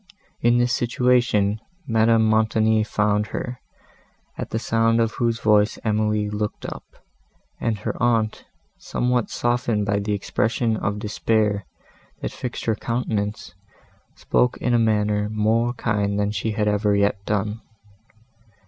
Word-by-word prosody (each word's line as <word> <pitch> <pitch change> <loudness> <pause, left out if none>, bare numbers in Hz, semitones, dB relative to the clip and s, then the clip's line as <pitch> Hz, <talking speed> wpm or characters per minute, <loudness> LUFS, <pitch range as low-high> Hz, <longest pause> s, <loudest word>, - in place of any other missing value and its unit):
In 120 +1 +4
this 120 0 +2
situation 120 -4 +2 0.3
Madame 115 -2 +3
Montoni 110 0 +3
found 105 -1 0
her, 125 0 -5 0.8
at - - -5
the - - -2
sound 115 0 +2
of 115 -1 +2
whose 115 -1 -1
voice 105 -1 +3
Emily 105 -1 +1
looked 105 0 -4
up, - - -6 0.8
and 115 -2 -1
her - - -5
aunt, 115 -2 +1 0.4
somewhat 125 -1 -1
softened 120 -3 0
by 100 0 +1
the 105 +1 -2
expression 110 +3 0
of 100 -1 -2
despair, 105 -2 0 0.5
that - - -4
fixed 125 - -6
her 115 - +2
countenance, 110 -5 -3 0.6
spoke 125 - +1
in 125 - 0
a 120 - +4
manner 105 -2 +1
more 110 +3 +1
kind 105 -4 -1
than 105 0 0
she 105 +2 -2
had 105 -1 0
ever 105 0 +2
yet 100 0 +1
done. 105 +1 -1
110 Hz, 135 wpm, -23 LUFS, 105-115 Hz, 0.8 s, In